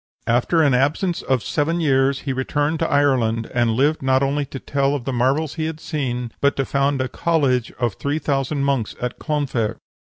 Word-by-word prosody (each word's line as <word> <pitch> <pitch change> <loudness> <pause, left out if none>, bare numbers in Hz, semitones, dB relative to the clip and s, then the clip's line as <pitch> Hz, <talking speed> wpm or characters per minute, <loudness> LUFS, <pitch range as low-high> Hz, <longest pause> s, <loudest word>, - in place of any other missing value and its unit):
"After 125 +8 +2
an 140 -3 +3
absence 155 +8 +1
of 130 -3 0
seven 165 +4 0
years 135 -3 +2
he 135 - -2
returned 145 +4 -1
to 165 - 0
Ireland, 125 -6 +1
and 120 -2 +2
lived 145 +5 +2
not 130 0 +2
only 140 +1 0
to 135 - -7
tell 140 +1 0
of 130 -4 -5
the 135 - -2
marvels 135 +5 +1
he - - 0
had 160 -1 -4
seen, 125 -7 -3
but 140 0 +3
to 135 - 0
found 140 0 +1
a 130 - -1
college 135 -7 0
of 120 -4 -1
three 140 +9 -2
thousand 140 -1 -1
monks 135 -6 0
at 125 0 -4
Clonfert." 140 -8 -1
140 Hz, 195 wpm, -21 LUFS, 125-145 Hz, -, an